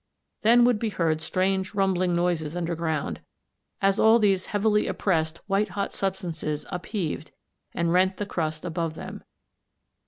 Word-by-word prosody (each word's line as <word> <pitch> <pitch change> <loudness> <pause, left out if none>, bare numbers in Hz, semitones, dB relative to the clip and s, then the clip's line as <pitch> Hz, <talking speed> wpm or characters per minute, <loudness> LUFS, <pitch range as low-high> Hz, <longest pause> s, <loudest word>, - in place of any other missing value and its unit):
Then 240 +2 +6
would 245 -3 +3
be 225 - -1
heard 165 -5 0
strange 190 +3 0
rumbling 185 -3 +2
noises 170 -3 0
underground, 165 -3 -2 0.6
as 195 +1 +3
all 220 +1 +6
these 195 -4 +2
heavily 210 0 +2
oppressed 160 -4 0
white 200 +1 +1
hot 200 +1 -3
substances 175 -6 -3
upheaved 175 -5 -3 0.5
and 170 0 +1
rent 185 +1 +3
the 205 - -2
crust 155 -4 -3
above 165 -2 -2
them. - - -8
185 Hz, 135 wpm, -26 LUFS, 165-200 Hz, 0.6 s, Then